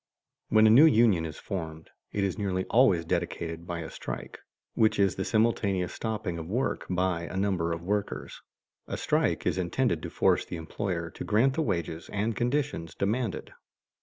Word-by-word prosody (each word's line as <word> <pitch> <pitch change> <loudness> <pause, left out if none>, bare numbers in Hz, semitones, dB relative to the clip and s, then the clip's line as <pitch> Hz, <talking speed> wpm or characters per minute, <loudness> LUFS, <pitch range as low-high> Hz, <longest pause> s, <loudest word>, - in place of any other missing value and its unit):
When 110 0 +5
a 110 - +7
new 140 +8 +9
union 110 - +4
is 75 - -8
formed, 80 -5 -6 0.2
it 100 - -1
is 95 -2 0
nearly 95 -3 -1
always 105 -9 +4
dedicated 85 -1 -3
by 85 -1 -3
a 80 - -6
strike, - - -7 0.3
which 110 0 +3
is 100 -2 +3
the 95 - -2
simultaneous 100 -5 +1
stopping 105 -6 -3
of 80 - -6
work 125 +7 -1
by 90 -2 0
a 90 - -6
number 95 -4 0
of 85 0 -4
workers. 100 +2 -3 0.5
A - - -4
strike - - 0
is - - +1
intended 90 0 0
to - - -5
force - - +2
the - - -7
employer 85 0 -3
to - - -7
grant 120 +6 +3
the 160 - 0
wages 85 - -2
and 105 +2 -1
conditions 125 - -1
demanded. 110 +1 -2
95 Hz, 175 wpm, -28 LUFS, 85-110 Hz, 0.5 s, new